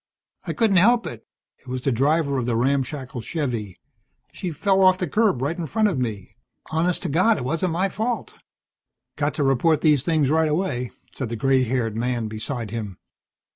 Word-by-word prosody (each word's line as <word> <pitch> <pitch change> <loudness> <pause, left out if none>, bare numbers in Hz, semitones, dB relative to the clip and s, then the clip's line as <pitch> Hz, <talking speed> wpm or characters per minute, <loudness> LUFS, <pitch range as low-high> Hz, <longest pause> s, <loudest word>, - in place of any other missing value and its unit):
"I - - -1
couldn't 215 -5 +3
help 230 +6 +4
it." 115 -2 -8 0.3
It - - -27
was 125 0 -4
the 135 - +1
driver 140 +3 +1
of 120 - -3
the 120 - +1
ramshackle 130 0 -1
Chevvie. 115 - -3 0.6
"She 185 - -4
fell 190 +5 +1
off 185 0 +6
the 180 - -2
curb 205 - +1
right 150 +5 -1
in 170 -3 -4
front 215 +5 +2
of 160 -9 -2
me. 105 -4 -4 0.3
Honest 170 +3 0
to 175 - -2
God, 185 +9 +3
it 135 - -4
wasn't 165 +5 -1
my 185 +4 +1
fault." 225 +5 -3 0.8
"Got 145 0 -1
to 150 - 0
report 140 +4 +2
these 150 -4 +4
things 155 -4 +2
right 160 0 +3
away," 150 -7 -1 0.2
said 130 -5 -4
the 115 - -3
grey 130 +2 +2
haired 115 -3 -1
man 120 0 -1
beside 110 +1 -5
him. 105 -5 -5
140 Hz, 190 wpm, -23 LUFS, 125-175 Hz, 0.8 s, off